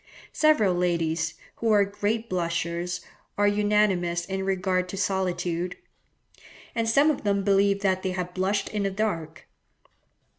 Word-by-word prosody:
Several 305 - +4
ladies, 165 -2 0 0.2
who 230 - 0
are 205 -1 +5
great 210 +3 -2
blushers, 170 -1 -2 0.4
are 205 0 +3
unanimous 205 -4 +2
in 190 +1 -3
regard 185 -1 0
to 195 - -5
solitude; 180 -2 -1 1.0
and 230 -1 0
some 280 +7 +5
of 290 - -5
them 200 -1 +1
believe 200 0 +3
that 190 -2 +1
they 185 -1 -2
have 180 -1 -4
blushed 190 +2 0
in 210 - -2
the 200 - +1
dark. 185 -6 -3
190 Hz, 140 wpm, -26 LUFS, 175-205 Hz, 1.0 s, are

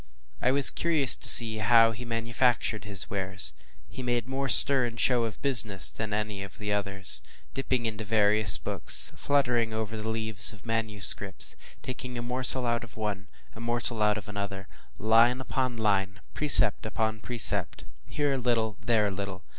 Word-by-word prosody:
I 125 - 0
was 140 +1 +6
curious 155 -7 +2
to - - -3
see 110 -2 +6
how 115 +1 +3
he 120 +2 -10
manufactured 115 -1 -3
his 100 -2 -1
wares. 100 0 +2 0.3
He - - -11
made 120 -2 -4
more 135 +1 -5
stir 135 -3 +9
and 115 -1 -10
show 120 -1 +1
of 110 - -9
business 110 -8 +5
than 110 -1 -8
any 105 -1 -5
of 100 +2 -12
the 105 -2 -5
others; 100 -1 0 0.3
dipping 130 -3 -4
into 110 -1 -6
various 105 -2 +3
books, - - -3
fluttering 120 -5 -2
over 110 0 -6
the 110 +1 -6
leaves 110 -2 +1
of 105 +1 -18
manuscripts, 105 -4 +1 0.3
taking 125 -1 -8
a 120 - -7
morsel 125 +1 -2
out 120 0 -3
of 115 -1 -15
one, 105 -3 -6 0.3
a - - -12
morsel 120 -1 -2
out 105 0 0
of 105 - -10
another, 100 -2 -8 0.3
“line 115 +4 +1
upon 130 -2 -5
line, 100 -2 -3
precept 140 -8 +2
upon 110 0 -4
precept, 120 +1 -3 0.2
here 145 -2 -3
a - - -3
little 115 -3 -3
and - - -22
there 110 -3 +1
a 100 - -3
little. 95 0 -8
110 Hz, 175 wpm, -25 LUFS, 105-120 Hz, 0.3 s, stir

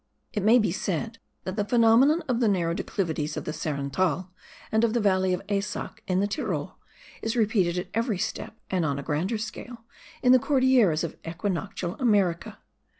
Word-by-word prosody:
It 210 - -1
may 220 +5 +6
be 215 -7 +2
said 205 +5 -3 0.2
that 185 +2 -5
the 205 - +2
phenomenon 240 +8 +4
of 245 -3 0
the 235 - +3
narrow 175 -5 +1
declivities 160 -5 -2
of - - -4
the 155 - -3
Sarenthal 155 +5 -1 0.4
and 220 +1 +2
of 230 0 +2
the - - +3
valley 190 -3 +2
of 180 +1 -1
Eysack 205 0 -3
in 185 0 +1
the - - +2
Tyrol, 205 - -3 0.4
is 225 +1 -2
repeated 205 -6 +2
at 180 +1 -4
every 230 -2 0
step, 220 +2 -4
and 185 -3 +1
on 140 -3 0
a 140 - -5
grander 165 +10 -1
scale, 225 +2 -7 0.4
in 250 - +6
the 255 - +7
Cordilleras 255 - +3
of 170 - -5
equinoctial 180 +1 -3
America. 205 -3 +1
200 Hz, 180 wpm, -26 LUFS, 175-225 Hz, 0.4 s, the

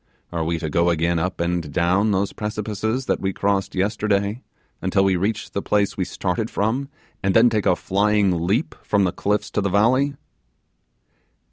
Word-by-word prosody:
Are 85 -2 -1
we 85 +1 -1
to 80 - -4
go 85 +3 +2
again 85 0 +1
up 90 +2 -2
and 85 -3 -1
down 95 +7 +2
those 100 -1 0
precipices 110 +3 -3
that - - 0
we 95 - -1
crossed 100 0 -1
yesterday, 100 +2 0 0.4
until 95 - +2
we 95 -1 +3
reach 100 +5 -2
the 100 - -2
place 100 -1 +1
we 95 - -1
started 95 +4 -2
from, 125 +7 -1 0.3
and 95 0 0
then 115 +1 +6
take 105 -2 0
a 90 - +4
flying 100 -3 +1
leap 115 - 0
from 100 -1 +1
the 90 - +1
cliffs 105 +3 -1
to 105 - 0
the 100 - 0
valley? 130 +8 +3
100 Hz, 175 wpm, -22 LUFS, 90-105 Hz, 0.4 s, then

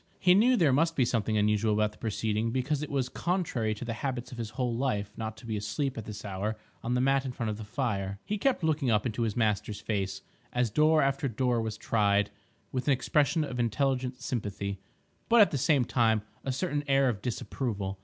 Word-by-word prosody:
He 180 -2 +5
knew 240 +6 +5
there 155 - +4
must 165 +4 +2
be 130 - +3
something 110 -2 0
unusual 105 +1 +2
about 105 0 +2
the - - -20
proceeding, 110 0 -1
because 130 +4 -1
it 150 - -4
was 135 -3 0
contrary 135 - -1
to 115 - -7
the 115 - -2
habits 125 0 -4
of 120 - -8
his 115 -2 -3
whole 120 0 -2
life 105 -5 -1
not 110 -1 -5
to - - -13
be 110 -2 -2
asleep 105 +7 -2
at 110 - -6
this 105 -1 -7
hour 100 +2 -3 0.3
on 120 +2 0
the 125 - +2
mat 135 +1 +3
in 130 - -3
front 115 -3 -3
of 105 - -5
the 110 - -6
fire. 105 -4 -2
He 210 0 -2
kept 260 -5 +1
looking 155 -4 +1
up 105 0 +2
into 120 -1 -2
his 110 -2 -1
master's 105 -2 0
face, 100 -3 -2 0.3
as 125 -3 +1
door 155 +5 +4
after 135 +1 +1
door 120 0 0
was 110 -1 -3
tried, 105 -2 +2 0.4
with 130 +1 -3
an 140 - +5
expression 150 +4 +2
of 125 -4 -4
intelligent 125 +2 0
sympathy, 100 -5 -3 0.5
but 235 - +6
at 210 - +7
the 140 - -1
same 140 -2 +3
time 110 -3 +2 0.2
a 135 - -1
certain 145 +1 -1
air 135 0 +4
of 110 -5 -1
disapproval. 105 -5 -3
120 Hz, 220 wpm, -29 LUFS, 105-135 Hz, 0.5 s, at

